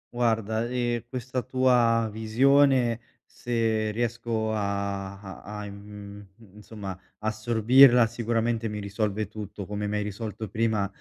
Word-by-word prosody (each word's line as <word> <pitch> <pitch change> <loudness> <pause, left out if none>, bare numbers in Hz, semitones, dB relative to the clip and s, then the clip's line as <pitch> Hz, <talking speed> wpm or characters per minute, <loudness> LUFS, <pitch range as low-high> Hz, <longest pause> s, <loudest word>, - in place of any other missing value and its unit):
Guarda, 115 -1 0
ehm, 120 -2 -1
questa 130 0 -3
tua 120 -2 +3
visione, 125 +2 +3 0.3
se 115 -2 -1
riesco 115 -1 -2
a 100 -1 -3
a 95 -2 -10
a 105 0 -7
in 100 - -8
mhmm, 100 0 -12
insomma 105 -3 -7 0.2
assorbirla, 115 +3 +5
sicuramente 115 0 -1
mi 105 - -4
risolve 105 +1 -2
tutto 105 -1 -7
come 105 +1 -3
mi 105 - -2
hai 105 - 0
risolto 105 0 -5
prima, 110 -2 0
110 Hz, 125 wpm, -26 LUFS, 105-120 Hz, 0.3 s, assorbirla